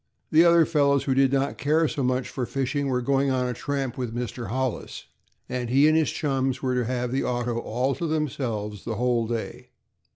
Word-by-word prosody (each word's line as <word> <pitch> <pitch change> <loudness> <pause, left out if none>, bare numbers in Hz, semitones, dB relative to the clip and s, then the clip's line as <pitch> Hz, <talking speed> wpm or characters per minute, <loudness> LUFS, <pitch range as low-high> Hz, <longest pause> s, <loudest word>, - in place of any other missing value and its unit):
The 160 +2 +6
other 170 -1 +6
fellows, 140 -3 +2
who 135 - +1
did 135 0 +3
not 140 0 0
care 155 +3 +2
so 140 - -3
much 130 0 0
for 125 -3 -4
fishing, 135 +1 -1
were 125 -2 0
going 140 +1 +2
on 130 -1 +1
a 125 - -1
tramp 135 -1 -3
with 120 -2 -3
Mr. 120 -1 -4
Hollis, 130 +3 -3 0.4
and 125 -2 -3
he 135 +4 +5
and 155 - +4
his 160 -1 +3
chums 135 -3 -1
were 130 -2 -1
to 125 -1 0
have 125 0 -2
the 135 - 0
auto 120 -1 -1
all 125 +4 -1
to 165 +6 -3
themselves 120 - -3
the 115 - -3
whole 120 0 +1
day. 115 -1 -5
130 Hz, 205 wpm, -25 LUFS, 120-140 Hz, 0.4 s, The